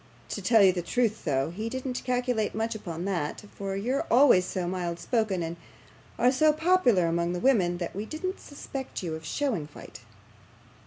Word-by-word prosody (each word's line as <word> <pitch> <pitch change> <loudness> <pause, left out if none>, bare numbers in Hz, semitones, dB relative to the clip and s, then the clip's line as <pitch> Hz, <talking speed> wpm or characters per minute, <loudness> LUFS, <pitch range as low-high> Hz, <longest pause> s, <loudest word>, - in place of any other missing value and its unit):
To 205 - -4
tell 220 +2 +5
you 190 -1 +6
the 175 - -2
truth 220 +5 -1
though, 140 0 0
he 215 +6 -4
didn't 260 0 -4
calculate 250 -4 0
much 225 +1 -1
upon 175 -5 -6
that, 175 -3 -2
for 195 -1 -4
you're 245 +8 -1
always 245 -8 +6
so 180 -1 -3
mild 175 -2 -2
spoken, 215 -4 0
and 165 +1 -5 0.6
are 245 +1 +4
so 305 +4 +4
popular 310 - +3
among 170 +1 0
the 180 - -2
women, 185 -8 +3
that 175 0 -5
we 210 +3 -4
didn't 370 - -4
suspect 275 -5 -7
you 165 -3 -3
of 160 0 -6
showing 215 - -2
fight. 150 - -12
205 Hz, 180 wpm, -27 LUFS, 175-250 Hz, 0.6 s, you